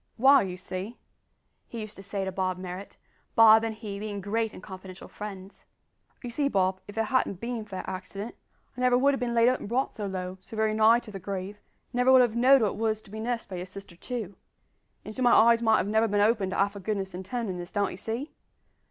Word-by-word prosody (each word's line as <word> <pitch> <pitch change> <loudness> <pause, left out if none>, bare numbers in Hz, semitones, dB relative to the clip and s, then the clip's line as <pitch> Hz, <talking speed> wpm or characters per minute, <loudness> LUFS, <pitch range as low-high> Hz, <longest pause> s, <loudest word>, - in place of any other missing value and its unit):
"W'y, 265 -5 +6
you 180 - -6
see," 190 +5 -6 0.7
he 235 - -7
used 215 -1 -6
to - - -9
say 195 0 -3
to 190 - -3
Bob 185 -1 -1
Marrot 185 +1 -8 0.4
Bob 220 0 +8
and 225 -1 -2
he 210 -3 -6
being 205 -1 -4
great 220 +3 -1
and 185 - -12
confidential 190 -1 -10
friends 195 -2 -9 0.6
"you 245 - -5
see, 280 +4 +1
Bob, 190 -5 +1
if 205 - -11
it 225 - +2
hadn't 240 -6 0
bin 235 0 -4
for 200 - -9
that - - -5
accident, 195 +4 -6 0.4
I 250 - -6
never 250 -1 +4
would 280 +2 +4
have 270 - -2
bin 240 -1 -2
laid 230 0 +5
up 255 +1 +2
and - - -7
brought 255 +3 0
so 210 -3 -4
low 185 -1 -5
so 220 +3 -11
very 220 0 +2
nigh 220 +2 +5
to 215 - -11
the 195 - -7
grave 195 +2 -5 0.3
and 245 - +1
I - - +4
would 260 0 +7
never - - +8
have 235 -2 0
know'd 255 +1 +6
what 210 - +3
it - - -7
was 220 -1 -1
to 195 - -16
be 220 - -6
nursed 235 +1 -2
by 185 - -6
your 180 +1 -5
sister 195 -2 -11
too; 215 -1 -6 0.7
and 215 - -7
so 255 - -5
my 245 -1 +5
eyes 230 +1 +6
might 220 -1 +4
have - - 0
never 220 +2 +2
bin 205 -1 0
opened 210 -2 +2
to - - -3
half 200 +1 +2
her 200 - -8
goodness 195 -1 -3
an' 180 - -5
tenderness, 190 -4 -4
d'ye 205 -1 0
see? 225 - -4
215 Hz, 250 wpm, -27 LUFS, 190-235 Hz, 0.7 s, Bob